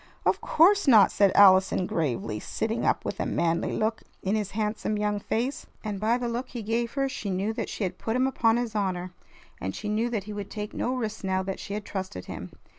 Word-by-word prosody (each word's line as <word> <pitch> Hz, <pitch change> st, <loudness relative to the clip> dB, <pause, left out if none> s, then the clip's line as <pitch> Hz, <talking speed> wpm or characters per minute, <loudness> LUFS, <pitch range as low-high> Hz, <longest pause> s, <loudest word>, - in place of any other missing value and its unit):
"Of -, -, +2 dB
course 390 Hz, +3 st, +4 dB
not!" 220 Hz, -6 st, +7 dB
said 200 Hz, -2 st, +4 dB
Allison 190 Hz, -2 st, +6 dB
gravely, 120 Hz, -11 st, -2 dB
sitting 225 Hz, -, -2 dB
up -, -, +1 dB
with -, -, -4 dB
a -, -, 0 dB
manly 170 Hz, 0 st, 0 dB
look 220 Hz, +1 st, 0 dB, 0.2 s
in 195 Hz, -, 0 dB
his 210 Hz, -3 st, 0 dB
handsome 215 Hz, 0 st, -1 dB
young 210 Hz, 0 st, 0 dB
face. 240 Hz, +7 st, -2 dB, 0.2 s
And 210 Hz, -3 st, -3 dB
by 225 Hz, +3 st, +2 dB
the 245 Hz, -1 st, -2 dB
look 240 Hz, +2 st, -3 dB
he 240 Hz, -3 st, -6 dB
gave 230 Hz, +2 st, -1 dB
her 275 Hz, -1 st, +1 dB
she 220 Hz, -6 st, -5 dB
knew 195 Hz, +4 st, -1 dB
that -, -, -3 dB
she -, -, -4 dB
had 185 Hz, -, -3 dB
put 225 Hz, -, -2 dB
him 255 Hz, +1 st, +3 dB
upon 235 Hz, -4 st, +2 dB
his 240 Hz, -2 st, -2 dB
honor, 185 Hz, -3 st, -2 dB, 0.5 s
and 95 Hz, +1 st, -4 dB
she 210 Hz, -, -4 dB
knew 220 Hz, +3 st, +1 dB
that 220 Hz, -5 st, -2 dB
he 210 Hz, +1 st, -7 dB
would 205 Hz, -1 st, -5 dB
take 210 Hz, -1 st, -5 dB
no 255 Hz, -, -1 dB
risks 220 Hz, -4 st, -4 dB
now 190 Hz, 0 st, 0 dB
that 190 Hz, 0 st, -4 dB
she 200 Hz, -, -5 dB
had 210 Hz, -1 st, -5 dB
trusted 190 Hz, -, -5 dB
him. -, -, -7 dB
210 Hz, 230 wpm, -27 LUFS, 190-230 Hz, 0.5 s, not